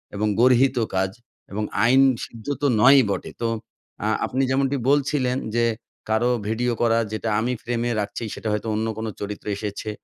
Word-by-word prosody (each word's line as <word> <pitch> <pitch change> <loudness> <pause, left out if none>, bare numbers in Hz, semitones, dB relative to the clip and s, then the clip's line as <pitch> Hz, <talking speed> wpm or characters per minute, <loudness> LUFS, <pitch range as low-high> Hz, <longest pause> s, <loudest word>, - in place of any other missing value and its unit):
এবং 105 +1 0
গর্হিত 130 +1 +4 0.2
কাজ 95 0 +1 0.4
এবং 105 +2 -2 0.2
আইন 130 +3 +5 0.2
সিদ্ধ 115 -2 -13
তো 145 - +3
নয়ই 135 +3 +8
বটে। 100 - -3
তো 115 - +1 0.6
আ - - +1 0.2
আপনি 130 - -1
যেমনটি 135 +1 +1
বলছিলেন, 140 -3 +1 0.2
যে 120 0 +3 0.4
কারো 110 +3 +2 0.2
ভিডিও 120 +3 0
করা 115 -1 +3
যেটা 110 +1 -2
আমি 120 +3 0
ফ্রেমে 120 0 -1
রাখছি 105 +3 -5
সেটা - - -6
হয়তো 105 +1 -2
অন্য 110 +1 -1
কোন 110 - -3
চরিত্র 105 0 -6
এসেছে 105 +1 -5
115 Hz, 165 wpm, -23 LUFS, 110-130 Hz, 0.6 s, নয়ই